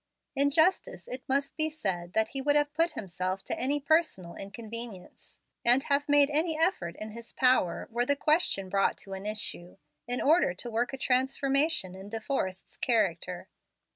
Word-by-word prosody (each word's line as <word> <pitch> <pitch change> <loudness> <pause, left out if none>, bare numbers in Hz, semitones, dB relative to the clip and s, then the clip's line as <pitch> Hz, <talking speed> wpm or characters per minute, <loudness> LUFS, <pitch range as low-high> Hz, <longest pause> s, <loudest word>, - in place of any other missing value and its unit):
In 280 +1 +3
justice 365 - +2
it 255 +1 -5
must 280 +2 0
be 315 0 0
said 185 - -3
that 220 0 +2
he 270 - -4
would 290 +2 +2
have 295 0 +2
put 330 +2 +1
himself 185 -1 -3
to - - -4
any 280 +3 +1
personal 285 - +1
inconvenience, 220 -1 -8 0.3
and 245 +3 +5
have 285 +1 0
made 290 0 +5
any 315 +2 +1
effort 310 - 0
in 215 0 -6
his 230 +1 -10
power, 250 -9 +2
were 240 +2 0
the 285 - +3
question 300 - +1
brought 195 +1 +1
to 195 - -8
an 190 +2 -5
issue, 210 -4 -4 0.3
in 245 +1 +1
order 300 - +3
to 240 +5 -6
work 235 +2 0
a 270 - -5
transformation 270 - +1
in 190 +2 -10
De 225 +1 -3
Forrest's 190 -7 -3
character. 185 -6 0
245 Hz, 175 wpm, -29 LUFS, 195-290 Hz, 0.3 s, and